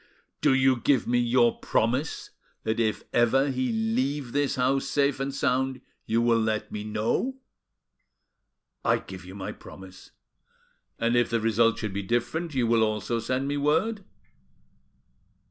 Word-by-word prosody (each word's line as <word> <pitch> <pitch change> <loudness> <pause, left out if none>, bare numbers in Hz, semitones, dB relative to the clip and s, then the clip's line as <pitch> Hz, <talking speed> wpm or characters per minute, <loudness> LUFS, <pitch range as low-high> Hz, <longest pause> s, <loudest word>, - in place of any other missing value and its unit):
"Do 130 - +4
you 130 -1 +4
give 135 +3 +2
me 120 0 +2
your 120 -1 +3
promise 125 +7 -1 0.3
that 110 +1 -1
if 110 -2 0
ever 135 +4 +3
he 130 -1 -1
leave 125 +4 -1
this 145 +1 0
house 130 +2 +1
safe 140 0 +1
and 135 0 -2
sound 130 -1 0 0.3
you 115 +1 +2
will 115 -1 +3
let 110 -1 -1
me 105 - -4
know?" 110 - -1 1.5
"I - - +3
give - - -10
you - - -10
my - - -5
promise." - - -13 0.9
"And 115 +1 +1
if 120 -1 +3
the 115 - +1
result 115 +1 +2
should 105 -3 -4
be 100 - -2
different, 120 - -2
you 125 -2 +2
will 115 0 +3
also 110 +1 0
send 130 +4 -2
me 145 +1 -1
word?" 165 +9 +1
120 Hz, 150 wpm, -26 LUFS, 115-135 Hz, 1.5 s, Do